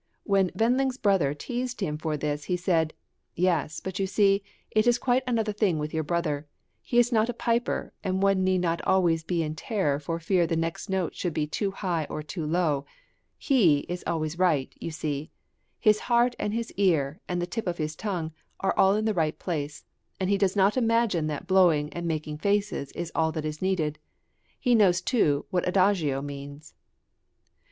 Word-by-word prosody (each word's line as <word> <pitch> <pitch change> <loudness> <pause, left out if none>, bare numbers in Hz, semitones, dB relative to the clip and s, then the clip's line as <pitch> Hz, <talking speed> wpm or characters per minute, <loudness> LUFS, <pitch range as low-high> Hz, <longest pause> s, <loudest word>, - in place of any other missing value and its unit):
When 195 -3 +2
Wend 235 +3 +3
ling's 265 -1 0
brother 190 - +2
teased 245 - -4
him 160 -8 -1
for 155 -2 -2
this 150 0 -3
he 180 - 0
said: 165 -3 +1 0.4
"Yes, 165 -4 +1
but 190 0 -5
you 195 - +1
see, 200 0 +3 0.3
it 215 +2 +2
is 240 0 +5
quite 250 0 +2
another 225 -3 +1
thing 200 -6 +1
with 150 0 -4
your 160 - 0
brother. 155 -2 -2 0.3
He 240 - -2
is 240 0 +5
not 225 0 +2
a 240 - -2
piper, 235 0 -1
and 190 -1 0
one 195 -1 +3
need 185 -1 +2
not 170 -1 0
be - - -9
always 175 -4 +3
in 165 -4 0
terror 155 -4 -1
for 165 +3 -3
fear 170 +1 +2
the 165 - 0
next 165 +4 -3
note 190 -3 -1
should 175 -4 -3
be 150 - +1
too 195 +7 -2
high 180 -5 -2
or 155 - -4
too 155 0 -5
low 155 -4 +1 0.5
he 180 - +3
is 180 0 -5
always 160 0 -2
right, 160 -8 +2
you - - -4
see; 155 -2 -4 0.5
his 215 -1 +4
heart 240 0 +2
and 210 - -1
his 230 0 -3
ear 160 -7 +2
and 175 -1 -1
the 175 - 0
tip 220 +4 -4
of 175 -1 -1
his 155 -1 -3
tongue 175 -6 -3 0.3
are 195 - +1
all 195 +1 +5
in 215 +1 0
the 220 - +2
right 160 -4 0
place, 150 -4 -4 0.3
and 190 +1 0
he 200 - +3
does 190 -1 +2
not 200 +1 +3
imagine 230 -9 +2
that 150 -2 -4
blowing 170 -6 +3
and 175 0 -4
making 155 -2 -3
faces 200 -7 0
is 170 -1 -5
all 160 0 +1
that 155 -1 -4
is 155 0 -4
needed; 165 -6 0 0.6
he 245 - +2
knows 195 -6 +5
too 175 - +1
what 180 -1 0
adagio 180 -8 +2
means." 145 +1 -8
180 Hz, 195 wpm, -27 LUFS, 155-200 Hz, 0.6 s, is